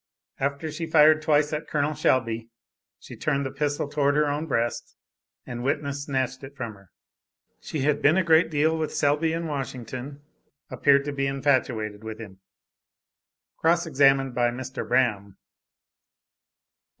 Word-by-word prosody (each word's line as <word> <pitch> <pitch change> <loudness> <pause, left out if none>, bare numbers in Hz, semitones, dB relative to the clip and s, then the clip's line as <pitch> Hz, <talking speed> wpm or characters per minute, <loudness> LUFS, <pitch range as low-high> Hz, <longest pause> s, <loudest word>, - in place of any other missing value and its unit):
After 140 +3 -2
she 165 +2 -4
had 160 - -12
fired 155 0 +6
twice 150 -1 +2
at 150 +1 -3
Col. 150 0 0
Selby, 115 -4 0 0.5
she - - -12
turned 140 -2 -1
the 135 - -4
pistol 145 +1 -2
towards 145 -1 +1
her 150 0 +3
own 145 +3 -2
breast, 120 -4 -2 0.5
and 120 0 -6
witness 140 +1 -2
snatched 130 -1 -2
it 135 +1 -10
from 115 -3 -5
her. 100 -3 -19 0.7
She 155 - -5
had 145 +1 +1
been 155 +5 +4
a 190 - +3
great 165 -1 +4
deal 155 +1 +2
with 155 - -3
Selby 150 +3 +2
in 165 +1 -3
Washington, 135 -1 -6 0.5
appeared 140 -1 +3
to 145 - -2
be 135 -1 -1
infatuated 130 -6 0
with 110 -1 -6
him. 100 -4 -11 1.2
(Cross 170 +1 +2
examined 135 -3 +3
by 120 -1 +2
Mr. 130 +2 -6
Braham.) 105 -6 0
140 Hz, 150 wpm, -25 LUFS, 125-150 Hz, 1.2 s, fired